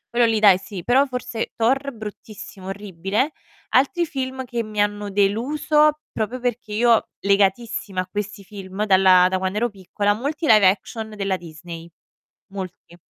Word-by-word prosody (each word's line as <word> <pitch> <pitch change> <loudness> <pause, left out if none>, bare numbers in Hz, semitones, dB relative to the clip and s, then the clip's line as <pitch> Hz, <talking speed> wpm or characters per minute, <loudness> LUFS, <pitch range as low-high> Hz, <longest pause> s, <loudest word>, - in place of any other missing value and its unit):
Quello 240 0 +5
lì 225 -1 +1
dai 200 -3 +6
sì, 195 -2 -8
però 265 +4 +3
forse 250 -3 -4
Thor 270 +5 +1
bruttissimo, 210 -4 -10
orribile. 195 - -2 0.4
Altri 285 +7 +2
film 260 -3 -4
che 240 -1 -3
mi 215 -2 -6
hanno 205 0 0
deluso, 295 +10 +2
proprio 225 +4 -3
perché 240 -3 -3
io 230 +1 +3
legatissima 200 0 +1
a 185 - -7
questi 205 -1 -5
film 195 0 -5
dalla 190 -2 +6
da 185 0 -1
quando 190 +2 -2
ero 240 +2 +1
piccola, 205 +1 -1
molti 285 +9 -3
live 215 -7 +6
action 220 +3 -4
della 195 -2 -1
Disney, 170 -1 -10 0.6
molti. 185 -3 -8
210 Hz, 150 wpm, -22 LUFS, 195-245 Hz, 0.6 s, dai